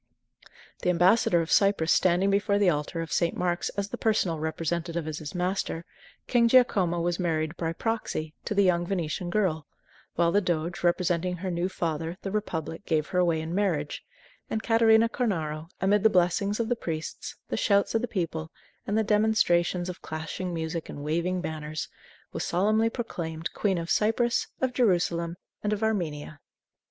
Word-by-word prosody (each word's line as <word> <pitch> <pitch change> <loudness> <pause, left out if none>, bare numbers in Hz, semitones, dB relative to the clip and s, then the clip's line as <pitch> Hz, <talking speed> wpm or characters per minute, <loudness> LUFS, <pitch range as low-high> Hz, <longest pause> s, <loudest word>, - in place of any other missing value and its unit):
The - - +1
ambassador 180 0 +4
of 165 - -4
Cyprus 195 -5 +4
standing 185 +2 +3
before 200 +1 +2
the 200 -3 +4
altar 150 +2 -2
of 165 - -5
St. 170 -1 +1
Mark's 175 -1 0
as 200 0 -1
the - - -6
personal 195 -7 +1
representative 165 +1 -2
of 155 -1 -4
his 155 +2 -7
master, 180 -2 -2 0.4
King 235 -2 +3
Giacomo 205 -9 +4
was 175 +1 -1
married 160 -2 -1
"by 165 -1 -2
proxy" 195 -7 -3
to 210 - -2
the 200 - +5
young 175 -2 +3
Venetian 175 -2 -2
girl; 175 -6 0 0.5
while 170 0 +3
the 205 - +3
doge, 170 -2 -2
representing 180 0 +1
her 185 +1 -4
new 175 +2 -1
father, 165 -1 -3
the 195 - -3
republic, 170 -5 -3
gave 155 -2 0
her 180 - 0
away 170 -3 +2
in 160 +1 -5
marriage, 175 -7 -1 0.5
and 220 - -2
Catarina 225 0 +5
Cornaro, 165 -10 -2
amid 200 +2 +3
the 220 - +6
blessings 190 +3 +1
of 230 - 0
the 245 - +1
priests, 160 -7 -5
the - - -1
shouts 200 -2 +2
of 225 - +2
the 245 - -2
people, 165 -6 -3 0.4
and 205 - 0
the 220 - +3
demonstrations 210 -5 +2
of 180 - -6
clashing 160 +3 -5
music 160 0 -4
and 145 - -7
waving 170 +4 0
banners, 155 -2 -4 0.5
was - - -3
solemnly 215 +5 +2
proclaimed 165 -9 -5
Queen 195 -3 0
of 170 0 -3
Cyprus, 235 +2 +2
of 260 -1 +1
Jerusalem, 175 -7 +1 0.2
and 210 - -1
of 210 +1 -2
Armenia. 155 -9 -2
175 Hz, 170 wpm, -27 LUFS, 165-205 Hz, 0.5 s, the